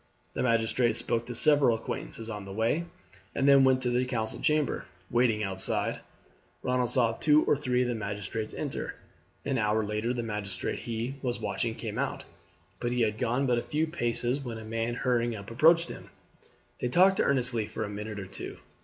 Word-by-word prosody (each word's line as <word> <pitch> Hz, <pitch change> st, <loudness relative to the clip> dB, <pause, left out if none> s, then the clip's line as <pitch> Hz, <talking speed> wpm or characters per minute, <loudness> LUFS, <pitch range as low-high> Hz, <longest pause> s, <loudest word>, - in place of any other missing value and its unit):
The -, -, -2 dB
magistrate 115 Hz, -1 st, +2 dB
spoke 115 Hz, 0 st, -1 dB
to 120 Hz, -, -5 dB
several 140 Hz, -3 st, +4 dB
acquaintances 115 Hz, 0 st, -4 dB
on 105 Hz, -3 st, -5 dB
the 100 Hz, -, -8 dB
way, 115 Hz, -, 0 dB, 0.5 s
and 135 Hz, -, +2 dB
then 140 Hz, -1 st, +7 dB
went 130 Hz, -1 st, +4 dB
to 125 Hz, -, +1 dB
the 125 Hz, +1 st, +2 dB
council 115 Hz, -4 st, -3 dB
chamber. 150 Hz, -3 st, +1 dB, 0.3 s
Waiting 120 Hz, -3 st, +3 dB
outside, 95 Hz, -1 st, 0 dB, 0.6 s
Ronald 125 Hz, -1 st, +1 dB
saw 120 Hz, -3 st, +3 dB
two 150 Hz, +6 st, +4 dB
or -, -, +4 dB
three 125 Hz, -3 st, +1 dB
of -, -, -1 dB
the 120 Hz, -, 0 dB
magistrates 110 Hz, 0 st, -4 dB
enter. -, -, -4 dB, 0.5 s
An 135 Hz, -3 st, 0 dB
hour 105 Hz, 0 st, +2 dB
later 105 Hz, +3 st, -1 dB
the 120 Hz, -1 st, -2 dB
magistrate 105 Hz, -4 st, -3 dB
he 120 Hz, +4 st, -4 dB
was 125 Hz, -2 st, -2 dB
watching 110 Hz, +3 st, -2 dB
came 110 Hz, -3 st, -5 dB
out; -, -, -2 dB, 0.6 s
but 120 Hz, -, -1 dB
he 125 Hz, 0 st, 0 dB
had 110 Hz, -1 st, +1 dB
gone 125 Hz, +3 st, +1 dB
but 120 Hz, -2 st, +2 dB
a -, -, -2 dB
few 155 Hz, +5 st, 0 dB
paces 125 Hz, -4 st, -1 dB
when 120 Hz, -5 st, -5 dB
a 110 Hz, -, -8 dB
man 115 Hz, +1 st, -2 dB
hurrying 120 Hz, -2 st, +1 dB
up 100 Hz, +1 st, -8 dB
approached 165 Hz, +8 st, +5 dB
him. -, -, -9 dB, 0.7 s
They -, -, 0 dB
talked 185 Hz, +8 st, +5 dB
earnestly 125 Hz, -5 st, +2 dB
for 110 Hz, -, -4 dB
a -, -, -3 dB
minute 105 Hz, +1 st, -5 dB
or 95 Hz, -, -5 dB
two. -, -, -7 dB
120 Hz, 190 wpm, -29 LUFS, 110-130 Hz, 0.7 s, then